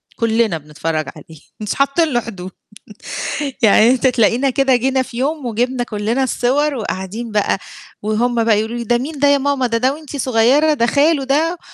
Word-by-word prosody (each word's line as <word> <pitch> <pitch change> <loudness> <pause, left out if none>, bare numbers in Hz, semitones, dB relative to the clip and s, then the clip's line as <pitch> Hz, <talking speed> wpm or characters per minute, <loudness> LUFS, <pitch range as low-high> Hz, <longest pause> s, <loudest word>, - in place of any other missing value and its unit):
كلّنا 225 -6 +1
بنتفرج 155 +1 -4
عليه، 160 -2 -14 0.2
مش 210 -1 -3
حاطين 280 +4 +2
له 240 - +3
حدود 190 -5 -8 1.1
يعني 220 +1 +5
أنت 260 +1 +2
تلاقينا 250 +2 +2
كده 265 -1 +2
جينا 260 +2 +1
في 250 - -10
يوم 290 +1 -2
وجبنا 245 +2 -1
كلّنا 220 +4 -2
الصور 270 +4 0
وقاعدين 215 0 -5
بقى، 210 -2 +1 0.4
وهُم 230 +2 0
بقى 220 -2 +3
يقولوا 220 +2 -3
لي: 235 - -4
"ده 240 +1 +1
مين 290 +4 -5
ده 285 +1 +3
يا 285 - +4
ماما؟ 280 -2 0
ده 230 -1 0
ده 260 +3 +1
وأنتِ 300 -2 -9
صغيرة، 265 +5 +3
ده 235 -4 +1
خاله 285 +2 +2
ده؟" 320 +6 0
245 Hz, 180 wpm, -18 LUFS, 220-275 Hz, 1.1 s, يعني